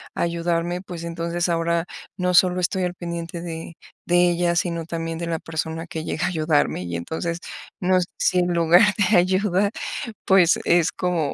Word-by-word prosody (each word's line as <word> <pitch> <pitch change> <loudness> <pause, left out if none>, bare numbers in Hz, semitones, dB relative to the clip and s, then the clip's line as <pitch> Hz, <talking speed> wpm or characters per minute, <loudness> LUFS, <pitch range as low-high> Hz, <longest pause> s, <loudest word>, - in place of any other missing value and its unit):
a - - -2
ayudarme, 170 +1 -1
pues, 175 -3 -8
entonces 170 +1 -2
ahora 170 0 0 0.3
no 180 0 0
solo 180 +1 +4
estoy 185 +1 0
al 180 0 -3
pendiente 170 -1 -5
de 165 -1 -7 0.3
de 175 0 +4
ella, 175 0 +1
sino 170 -1 -1
también 165 0 -4
de 170 - -3
la 165 -1 -1
persona 160 0 -4
que 160 -1 -5
llega 155 - -2
a - - +1
ayudarme 155 - +1
y 85 -1 -5
entonces 160 - -3 0.4
no 185 0 +3
sé 175 - -3
si 180 - +2
en 175 - +2
lugar 170 +2 +5 0.3
de - - +5
ayuda, 190 +2 +2 0.6
pues, 185 -3 +5
es 170 -1 +3
como 170 -5 -1
170 Hz, 180 wpm, -23 LUFS, 165-180 Hz, 0.6 s, lugar